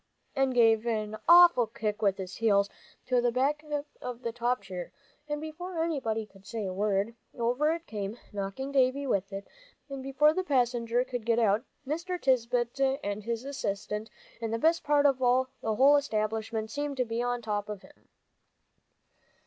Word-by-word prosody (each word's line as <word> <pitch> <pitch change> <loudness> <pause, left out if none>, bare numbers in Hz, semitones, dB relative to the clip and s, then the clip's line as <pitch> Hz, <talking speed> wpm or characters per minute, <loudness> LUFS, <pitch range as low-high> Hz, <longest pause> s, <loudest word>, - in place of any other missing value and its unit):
and 270 -2 +1
gave 225 -1 +4
an 215 -2 -1
awful 345 -9 +8
kick 215 -1 -3
with 200 -2 +2
his 190 -1 -6
heels 200 -3 +3 0.4
to 250 -1 +2
the 240 0 +2
back 280 +5 0 0.4
of 250 0 -6
the 230 - -2
top 240 +2 -1
chair, 180 -2 -6 0.4
and 295 0 -2
before 325 +2 -4
anybody 230 -9 -1
could 195 -2 -20
say 225 0 -4
a 185 - -3
word, 200 +2 0 0.2
over 250 +6 +1
it 335 0 -4
came, 210 -2 -5 0.2
knocking 200 +7 -4
Davie 270 +1 +2
with 200 -6 0
it, 195 0 -6 0.4
and 275 -1 -5
before 275 +3 +3
the 370 - -1
passenger 245 -5 +1
could 245 -2 -5
get 230 0 +2
out, 220 -1 +3 0.2
Mr. 340 +6 -3
Tisbett 255 +1 +1
and 205 +1 -3
his 230 +3 -3
assistant 210 -5 -3 0.3
and 225 -1 -2
the 230 - 0
best 325 +7 +2
part 290 -1 +3
of 275 -2 +4
the 255 -2 +1
whole 275 +5 +6
establishment 220 -3 -2
seemed 290 0 -3
to 250 - +1
be 230 +1 -2
on 245 0 -1
top 210 -1 -2
of 205 -2 -6
him. - - -20
240 Hz, 175 wpm, -29 LUFS, 215-275 Hz, 0.4 s, awful